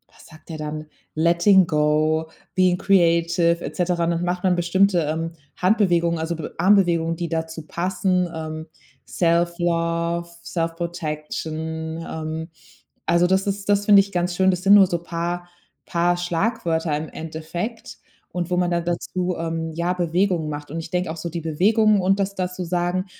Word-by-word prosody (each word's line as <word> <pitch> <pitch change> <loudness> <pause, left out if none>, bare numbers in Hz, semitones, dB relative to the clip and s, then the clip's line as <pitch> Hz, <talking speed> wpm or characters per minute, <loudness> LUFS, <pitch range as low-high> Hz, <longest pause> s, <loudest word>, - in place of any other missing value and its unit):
Was - - -17
sagt 155 +2 -17
er 155 - -5
dann? 155 0 -5 0.3
„Letting 170 +4 +5
go, 155 0 +1 0.3
being 185 -1 +3
creative“, 170 -2 +3
et - - -6
cetera. 175 -1 0
Und 170 - +1
dann 170 +1 -1
macht 180 +1 -2
man 180 -1 +3
bestimmte, 180 +2 +3
ähm, 165 +2 -2 0.3
Handbewegungen, 175 -4 +2
also 165 +1 -2
B 155 - -6
Armbewegungen, 175 -4 +3
die 170 0 -4
dazu 160 -1 -3
passen, 180 0 0
ähm: 160 0 -6 0.4
self 170 0 +1
love, 170 0 0
self 165 -1 -2
protection, 160 -1 -4
ähm. 160 +1 -5 0.6
Also, 170 +1 +4
das 190 +2 +1
ist 200 0 -3
das 205 0 +3
finde 200 -1 +8
ich 200 0 -6
ganz 175 -1 -1
schön. 190 0 +4
Das 180 0 -3
sind 200 +1 +7
nur 195 -2 +8
so 170 -1 -1
paar 175 +1 -4 0.4
paar 175 +1 +2
Schlagwörter 175 -3 -1
im 155 +1 -5
Endeffekt 165 +8 -6 0.3
und 175 0 -3
wo 180 - +2
man 180 -1 +2
dann 170 0 0
dazu, 180 +1 -2
ähm, 165 -1 -3
ja, 170 +2 0
Bewegungen 175 -1 0
macht. 145 -1 -6
Und 165 - -4
ich 165 - -8
denke 180 -2 -1
auch 165 - -7
so, 170 +2 -4
die 170 0 -5
Bewegungen 205 +6 +3
und 195 +2 +2
das 195 0 -1
da 180 -1 -1
zu 180 0 -6
sagen, 175 +2 -1
170 Hz, 175 wpm, -22 LUFS, 160-180 Hz, 0.6 s, finde